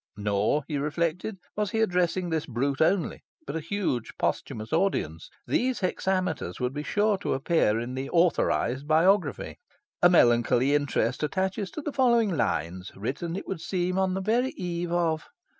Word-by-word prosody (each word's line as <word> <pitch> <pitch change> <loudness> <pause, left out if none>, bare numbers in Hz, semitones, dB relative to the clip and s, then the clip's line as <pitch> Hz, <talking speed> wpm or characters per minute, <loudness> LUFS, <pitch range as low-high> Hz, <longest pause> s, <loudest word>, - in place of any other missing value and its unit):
Nor, 105 +7 +1
he 150 -3 -2
reflected, 170 +7 -2 0.2
was 210 -1 0
he 220 - -1
addressing 180 -3 +1
this 160 -2 -1
brute 135 +3 -1
only, 170 +2 +1 0.2
but 140 - -5
a - - 0
huge 165 - -2
posthumous 110 +5 -2
audience. 160 - 0 0.2
These 255 -1 0
hexameters 185 - -1
would 125 +1 -1
be 145 - -3
sure 205 +5 +1
to 200 - -1
appear 135 -6 +2
in 120 +2 -4
the 130 +1 -4
"authorised" 145 -5 +1
biography. 180 +6 +2 0.4
"A 175 - +7
melancholy 120 -3 +4
interest 145 -3 0
attaches 190 +5 -1
to 310 - -5
the 295 - -4
following 235 -7 +3
lines, 90 - -2
written, 140 - -4
it 195 - -6
would 185 -4 -4
seem, 180 +1 -1
on 190 -1 +1
the 190 - -2
very 235 +6 +1
eve 175 -1 -3
of"... 165 -3 0
170 Hz, 160 wpm, -27 LUFS, 135-190 Hz, 0.4 s, A